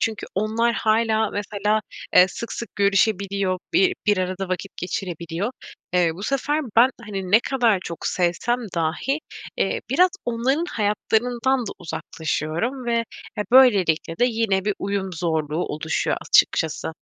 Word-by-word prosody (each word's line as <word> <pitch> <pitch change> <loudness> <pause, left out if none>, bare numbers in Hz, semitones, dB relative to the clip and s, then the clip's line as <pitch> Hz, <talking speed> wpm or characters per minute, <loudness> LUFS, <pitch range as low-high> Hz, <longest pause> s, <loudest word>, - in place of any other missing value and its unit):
Çünkü 220 -2 -2
onlar 225 +4 +1
hâlâ 220 -1 +2
mesela, 205 +1 -1 0.4
eee, 180 - +9
sık 235 - -6
sık 235 - -7
görüşebiliyor, 200 -1 +1 0.2
bi 375 +1 +4
bir 205 -2 +3
arada 185 +1 -2
vakit 185 +2 -4
geçirebiliyor. 180 +1 -4 0.4
Eee, 175 -2 +4
bu 190 - -9
sefer 280 +5 0 0.2
ben, 250 +3 +7
hani, 195 -5 -5
ne 220 +3 +7
kadar 240 -7 +2
çok 170 - -5
sevsem 180 +7 0 0.2
dahi, 170 - -1 0.4
eee, - - 0
biraz 365 +1 +4
onların 255 +7 0
hayatlarından 235 +5 0
da - - -3
uzaklaşıyorum 165 - -3
ve, 235 0 +1 0.4
e, 210 - +2
böylelikle 190 -11 +4
de 245 - +4
yine 220 -5 +1
bir 210 - 0
uyum 195 -1 -2
zorluğu 160 -1 -1
oluşuyor 155 +1 -1
açıkçası. 160 0 +2
205 Hz, 135 wpm, -23 LUFS, 180-235 Hz, 0.4 s, eee